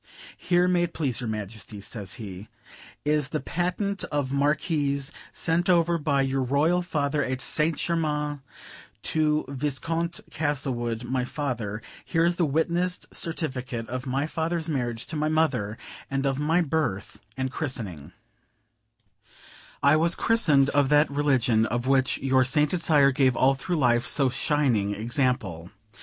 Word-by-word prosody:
"Here, 180 0 +2
may 180 -1 +2
it 175 -1 -2
please 130 -7 -1
your 120 - -3
Majesty," 105 0 -6
says 100 -1 -4
he, 100 -2 -8 0.6
"is 150 -1 +1
the 155 - -2
Patent 180 +5 -2
of 140 -3 -2
Marquis 140 -1 +1 0.2
sent 170 +2 +1
over 170 -1 +3
by 140 -2 +1
your 135 0 0
Royal 145 +7 +2
Father 150 -4 -1
at 130 0 -2
St. 155 +4 0
Germains 150 -3 -1 0.6
to 155 -1 +1
Viscount 165 +5 -2
Castlewood, 130 -6 -1
my 125 +1 -1
father: 120 -7 -4 0.2
here 165 -1 +1
is 175 0 +1
the 170 - +2
witnessed 170 +5 -1
certificate 130 -9 -2
of 130 +2 -4
my 135 +3 0
father's 160 +1 -2
marriage 120 -6 -2
to 160 - -7
my 155 0 0
mother, 125 -10 0 0.3
and 135 0 -1
of 135 0 0
my 160 +4 +2
birth 150 - -2 0.2
and 130 0 -2
christening; 115 - -4 1.7
I 140 +2 +6
was 170 +2 +3
christened 150 -12 +3
of 140 -2 +2
that 150 0 +4
religion 130 -6 +2
of 120 +2 -2
which 135 -1 +2
your 130 -1 +2
sainted 150 +6 +2
sire 145 -4 +4
gave 130 -2 +2
all 135 +3 +4
through 170 +6 -3
life 120 -4 +2
so 135 -3 +3
shining 125 -8 +1
example. 110 - -1
140 Hz, 145 wpm, -26 LUFS, 125-160 Hz, 1.7 s, I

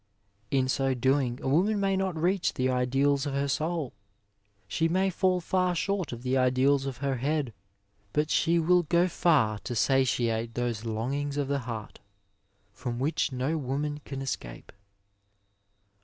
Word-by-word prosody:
In 130 +1 +1
so 135 0 +1
doing 130 0 +1
a - - -2
woman 190 +10 +2
may 195 -1 +1
not 190 -4 -1
reach 180 +3 +1
the 130 0 +1
ideals 135 +3 +1
of 140 - -3
her 140 +1 0
soul; 155 0 -2 0.7
she 165 - +1
may 190 +3 +1
iaSl 185 0 +1
far 185 0 +1
short 195 +1 -1
of 120 0 -7
the 130 0 0
ideals 130 +2 +3
of 135 - -5
her 135 -2 0
head, 140 -1 -1 0.6
but 150 +5 0
she 170 0 +3
will 175 +2 +4
go 170 +2 +2
far 140 - +2
to 120 - -5
satiate 115 -3 +1
those 120 -2 -2
longings 135 +6 -2
of 145 -2 0
the 140 0 +1
heart 110 -2 -6 0.7
from 120 -2 -5
which 145 +3 0
no 135 +5 -1
woman 145 +2 -2
can 135 -1 -6
escape. - - -6
140 Hz, 155 wpm, -28 LUFS, 125-165 Hz, 0.7 s, will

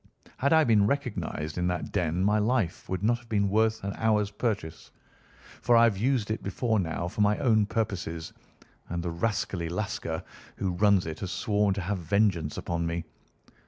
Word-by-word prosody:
Had 140 - +1
I 160 -1 +6
been 110 -6 +4
recognised 90 - -2
in 90 - +1
that 90 -2 -2
den 85 +1 0
my 105 +2 +3
life 110 -5 0
would 95 0 -2
not 120 +2 +2
have 120 -1 -20
been 100 -2 +1
worth 110 0 +2
an 100 0 -3
hour's 105 -2 +1
purchase; 100 -8 -3 0.7
for 120 -1 +4
I 115 - +7
have 115 -3 +4
used 115 0 0
it 110 - -2
before 110 +3 0
now 85 -1 -2
for 100 - -3
my 105 0 +3
own 110 -6 +3
purposes, 95 -7 -3 0.6
and 85 0 -3
the 85 - -2
rascally 85 -2 -2
Lascar 85 -3 -3 0.3
who 95 - -1
runs 100 +1 +3
it 80 -1 -5
has 95 - -4
sworn 105 -4 +1
to 100 - -2
have 95 +2 -2
vengeance 85 -3 +1
upon 85 -1 -2
me. 85 0 -2
100 Hz, 185 wpm, -28 LUFS, 85-110 Hz, 0.7 s, I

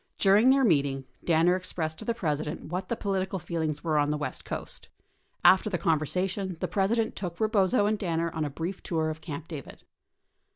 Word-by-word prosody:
During 205 +5 +5
their 270 0 +5
meeting, 140 - +2 0.2
Danner 170 +1 +4
ex 185 0 -3
pressed 160 -2 -3
to - - -6
the 235 - 0
President 155 -4 -3
what 180 +2 -3
the 235 - 0
political 195 -2 -2
feelings 160 -4 -3
were 155 -3 +2
on 145 0 +2
the 150 - 0
west 145 -3 -5
coast. - - -6 0.6
After 190 +3 +6
the 185 - -1
conversation, 180 +3 0
the - - -1
President 220 +3 0
took 175 -3 -5
Rebozo 215 0 +3
and 210 0 +1
Dinner 170 -3 -1
on 160 - -1
a 150 - -1
brief 170 +6 -5
tour 160 -2 -1
of 155 0 -8
Camp 155 0 -6
David. 150 -6 -9
175 Hz, 195 wpm, -28 LUFS, 155-195 Hz, 0.6 s, After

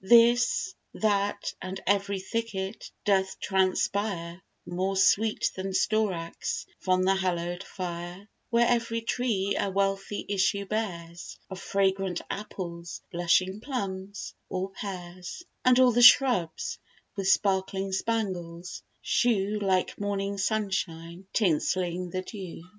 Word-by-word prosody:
This, 240 - +5 0.2
that, 205 -2 0
and 190 +1 -5
ev'ry 200 0 +1
thicket 195 0 -4 0.2
doth 190 -2 +2
transpire 190 -2 0 0.2
More 190 +2 -1
sweet 215 +3 +3
than 190 0 -4
storax 190 -5 0
from 185 -1 +2
the 190 +1 +4
hallow'd 175 -1 -1
fire; 180 +1 -6 0.2
Where 235 0 +4
ev'ry 230 -1 +1
tree 220 -4 0
a 200 - +1
wealthy 195 +1 -1
issue 200 0 +1
bears 175 -5 -4
Of 190 - -5
fragrant 195 -2 +1
apples, 175 -5 -6
blushing 185 +3 +2
plums, 200 -6 -4 0.2
or 190 +1 -2
pears; 185 - -7 0.2
And 250 0 +6
all 255 -1 +7
the 240 +1 +3
shrubs, 240 - +5 0.4
with 195 -2 -2
sparkling 195 0 +2
spangles, 185 -5 -2 0.2
shew 210 -3 +2
Like 190 -2 +1
morning 200 0 -2
sun 210 0 0
shine, 170 0 -4
tinselling 180 -1 +1
the 185 +1 -3
dew. 185 -5 -8
195 Hz, 115 wpm, -28 LUFS, 185-210 Hz, 0.4 s, all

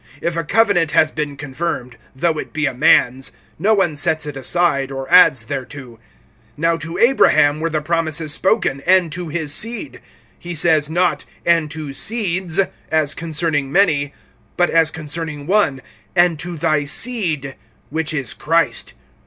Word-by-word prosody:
If 170 +2 -2
a 165 - -1
covenant 175 -3 +2
has 155 - +4
been 150 -3 -4
confirmed, 135 -3 -4 0.2
though 160 +3 0
it - - -7
be 155 0 -1
a 135 - -1
man's, 130 +1 +3 0.3
no 215 +2 +3
one 175 -6 +1
sets 155 +1 +1
it 145 -2 -6
aside, 140 0 0
or 135 0 -5
adds 130 -3 +6
thereto. 130 -2 -7 0.6
(16)Now 165 +1 0
to 165 +2 -6
Abraham 155 - +4
were 165 +1 -1
the 155 -2 -2
promises 160 -1 -1
spoken, 185 -7 0
and 185 -3 +4
to 175 +1 -5
his 155 -2 -3
seed. 235 - -4 0.4
He 175 0 -6
says 155 -2 +2
not, 175 +2 0 0.2
and 165 -3 +2
to 155 -2 -7
seeds, 185 -2 -1 0.3
as 155 -2 +1
concerning 155 -4 -2
many; 150 -6 +2 0.5
but 175 - +2
as 165 -1 +4
concerning 155 -1 -5
one, 175 -8 +1 0.3
and 175 -3 +3
to 175 0 -6
thy 155 -2 +1
seed, 155 - -2 0.4
which 160 +1 -2
is 140 -7 -3
Christ. 165 +1 -1
160 Hz, 155 wpm, -19 LUFS, 145-170 Hz, 0.6 s, adds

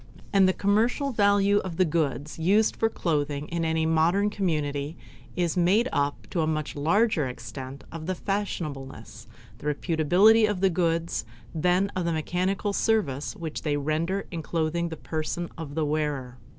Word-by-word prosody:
And 195 -2 +5
the - - +5
commercial 230 +9 +1
value 205 -2 +3
of 180 -4 -5
the 185 - +4
goods 155 -2 -2
used 200 +7 +3
for 225 - +1
clotting 150 -6 -1
in 170 0 -2
any 160 0 +1
modern 170 +6 +2
community 150 -6 -2 0.4
is 175 -2 0
made 190 +7 +3
up 145 0 -1
to 170 - 0
a 155 - +1
much 155 -1 -2
larger 165 - +2
extent 130 +1 -8
of 160 0 -7
the 185 - -1
fashionableness, 165 -9 -4 0.3
the - - -6
reputability 180 +9 +4
of 205 -3 -1
the 190 0 +3
goods 165 -4 0 0.3
than 180 +4 +2
of 185 -2 -1
the 170 - 0
mechanical 185 +5 -1
service 195 - 0
which 165 -5 -5
they 145 -2 0
render 160 +7 -1
in 170 -3 -4
clothing 165 +1 -1
the 160 - -6
person 160 +2 -3
of 155 -3 -7
the 160 -1 +1
wearer. 145 -5 -2
165 Hz, 165 wpm, -26 LUFS, 150-195 Hz, 0.4 s, And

